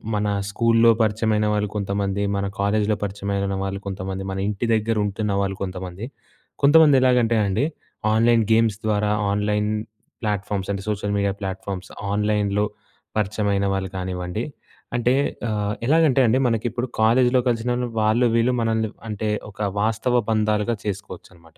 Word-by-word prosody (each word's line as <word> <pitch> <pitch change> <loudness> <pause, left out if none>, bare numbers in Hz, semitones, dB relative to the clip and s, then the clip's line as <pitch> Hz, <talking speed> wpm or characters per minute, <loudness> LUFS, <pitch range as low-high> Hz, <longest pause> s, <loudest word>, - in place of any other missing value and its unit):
మన 105 0 0 0.2
స్కూల్‌లో 115 +1 +4
పరిచయమైన 110 0 +1
వాళ్ళు 105 -1 0
కొంతమంది, 100 0 -1
మన 100 0 -1
కాలేజ్‌లో 105 +1 +1
పరిచయమైనన 100 -1 -2
వాళ్ళు 95 0 -3
కొంతమంది, 95 0 -4
మన 95 - -4
ఇంటి 105 +2 -2
దగ్గర 110 +1 +1
ఉంటున్నవాళ్ళు 100 -1 -1
కొంతమంది, 95 +2 -6 0.6
కొంతమంది 145 0 +7
ఎలాగంటే 120 -3 +3
అండి 100 +7 +1 0.5
ఆన్‍లైన్ 115 +1 +4
గేమ్స్ 110 -2 +3
ద్వారా, 105 -1 +1 0.2
ఆన్‍లైన్ 105 +1 0 0.5
ప్లాట్‍ఫామ్స్ 105 -2 -2
అంటే 100 -1 -5
సోషల్ 100 -1 -2
మీడియా 100 -1 +1
ప్లాట్‍ఫామ్స్ 95 -1 -5 0.2
ఆన్‍లైన్‌లో 105 0 +1 0.5
పరిచయమైన 100 -1 0
వాళ్ళు 95 -1 -2
కానివ్వండి, 90 +3 -3 0.5
అంటే 120 +1 +2 0.4
ఆహ్, 105 -1 -1
ఎలాగంటే 155 -2 +4
అండి 120 +4 +3
మనకిప్పుడు 120 +2 -1
కాలేజ్‌లో 125 +3 +4
కలిసినవాళ్ళు 120 +1 0
వాళ్ళు 110 +3 +3
వీళ్ళు 115 +2 +3
మనల్ని 110 -1 0 0.2
అంటే 105 0 -2 0.2
ఒక 105 - -17 0.2
వాస్తవ 115 +3 0 0.2
బంధాలుగా 110 +1 +1
చేసుకోవచ్చన్నమాట. 90 -4 -8
105 Hz, 130 wpm, -23 LUFS, 100-115 Hz, 0.6 s, కొంతమంది